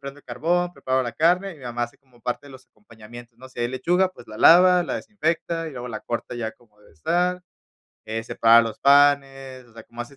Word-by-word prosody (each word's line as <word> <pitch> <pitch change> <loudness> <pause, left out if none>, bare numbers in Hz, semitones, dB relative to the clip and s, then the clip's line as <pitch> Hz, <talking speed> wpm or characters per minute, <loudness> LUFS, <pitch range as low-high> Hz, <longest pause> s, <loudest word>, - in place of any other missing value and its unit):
prendo 140 +1 -9
el - - -21
carbón, 175 +8 -1
preparo 130 -4 -1
la 120 - -5
carne, 180 +7 +1
y - - -14
mi - - -17
mamá 120 -1 -3
hace 120 - -14
como 130 -4 -27
parte 125 +4 -5
de - - -14
los 130 -1 -15
acompañamientos, 115 +2 -15
¿no?, 130 +1 -13
si 125 - -9
hay 120 - 0
lechuga, 175 +9 +1
pues, 120 - -15
la 110 - -10
lava, 180 +4 +6
la - - -4
desinfecta 165 -4 -3
y - - -9
luego 125 -2 -8
la 110 -3 -6
corta 120 +1 -5
ya 115 -2 -4
como 110 -2 -27
debe - - -21
estar, 180 - -1 0.6
eh, 110 +1 -4
separa 115 0 +4
los 115 -1 -6
panes, 135 -2 +2
o 115 - -23
sea, 115 -1 -12
como 120 +1 -9
hace 120 +4 -11
130 Hz, 235 wpm, -23 LUFS, 120-160 Hz, 0.6 s, lava